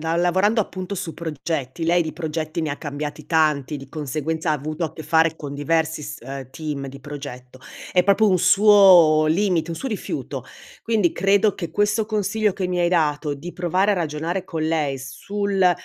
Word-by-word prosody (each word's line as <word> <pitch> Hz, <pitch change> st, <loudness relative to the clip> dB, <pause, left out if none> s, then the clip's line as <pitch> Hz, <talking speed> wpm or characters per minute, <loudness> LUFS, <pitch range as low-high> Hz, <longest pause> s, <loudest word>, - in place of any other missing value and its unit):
lavorando 180 Hz, +7 st, +2 dB
appunto 185 Hz, +1 st, -6 dB
su 170 Hz, -3 st, -5 dB
progetti, 160 Hz, -2 st, -4 dB
lei 175 Hz, +2 st, +3 dB
di 160 Hz, -2 st, -3 dB
progetti 160 Hz, 0 st, -3 dB
ne 155 Hz, -, -2 dB
ha 140 Hz, -, -4 dB
cambiati 145 Hz, +1 st, -6 dB
tanti, 155 Hz, -3 st, +1 dB
di 135 Hz, -1 st, -10 dB
conseguenza 155 Hz, +2 st, -3 dB
ha -, -, +4 dB
avuto 155 Hz, +3 st, -3 dB
a 160 Hz, -, -4 dB
che 160 Hz, -, -8 dB
fare 160 Hz, 0 st, +2 dB
con 145 Hz, -3 st, -7 dB
diversi 160 Hz, +2 st, 0 dB
s -, -, -6 dB
ehm, 135 Hz, 0 st, -7 dB
team 150 Hz, -2 st, -5 dB
di 135 Hz, +1 st, -9 dB
progetto; 130 Hz, -3 st, -9 dB, 0.3 s
è 180 Hz, -, +4 dB
proprio 200 Hz, +3 st, +4 dB
un 185 Hz, -, +3 dB
suo 180 Hz, -4 st, +6 dB
limite, 180 Hz, 0 st, +1 dB
un 165 Hz, -, -4 dB
suo 270 Hz, -, -4 dB
rifiuto. 215 Hz, -5 st, -5 dB, 0.4 s
Quindi 215 Hz, -6 st, +1 dB
credo 200 Hz, +2 st, +2 dB
che 170 Hz, -4 st, -5 dB
questo 210 Hz, +4 st, +1 dB
consiglio 210 Hz, -1 st, 0 dB
che 190 Hz, -2 st, -2 dB
mi 180 Hz, 0 st, -2 dB
hai 175 Hz, -, +3 dB
dato 150 Hz, -3 st, +1 dB
di 165 Hz, +5 st, -8 dB
provare 185 Hz, +3 st, +1 dB
a -, -, +3 dB
ragionare 170 Hz, +2 st, -2 dB
con 160 Hz, -3 st, -4 dB
lei 155 Hz, -4 st, 0 dB
sul 195 Hz, +7 st, 0 dB
165 Hz, 185 wpm, -22 LUFS, 150-185 Hz, 0.4 s, suo